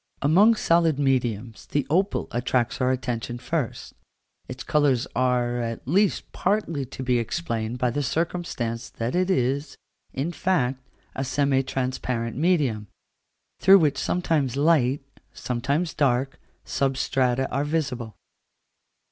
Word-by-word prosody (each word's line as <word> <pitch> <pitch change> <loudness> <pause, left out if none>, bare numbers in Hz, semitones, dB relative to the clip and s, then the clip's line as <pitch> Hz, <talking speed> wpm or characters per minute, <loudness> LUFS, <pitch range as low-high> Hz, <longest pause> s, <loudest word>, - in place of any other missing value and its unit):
Among 195 +10 +5
solid 165 -6 +2
mediums 120 -5 -1
the 145 -2 -1
opal 190 +6 +1
attracts 120 0 0
our 130 - +3
attention 120 -2 -2
first: 145 0 -3 0.5
its 130 0 -7
colours 145 -5 +2
are, 125 -1 +1
at 115 0 -4
least, 195 +6 +1
partly 180 -8 -1
to 130 +1 -7
be 125 -1 +2
explained 115 -3 -3
by 125 -1 +1
the 145 - -1
circumstance 140 -6 -2
that 115 +2 -4
it 185 +1 +1
is, 140 -1 0 0.3
in 140 +6 -2
fact, 135 -6 0 0.3
a 135 - -3
semi 135 0 +1
transparent 125 -3 -3
medium, 140 - +1 0.7
through 195 +1 +8
which 150 -6 +2
sometimes 155 -8 0
light, 145 -3 +3 0.3
sometimes 140 +7 -2
dark, 135 -1 0 0.3
substrata 130 -1 0
are 140 +2 0
visible. 135 -7 -2
135 Hz, 120 wpm, -25 LUFS, 125-155 Hz, 0.7 s, through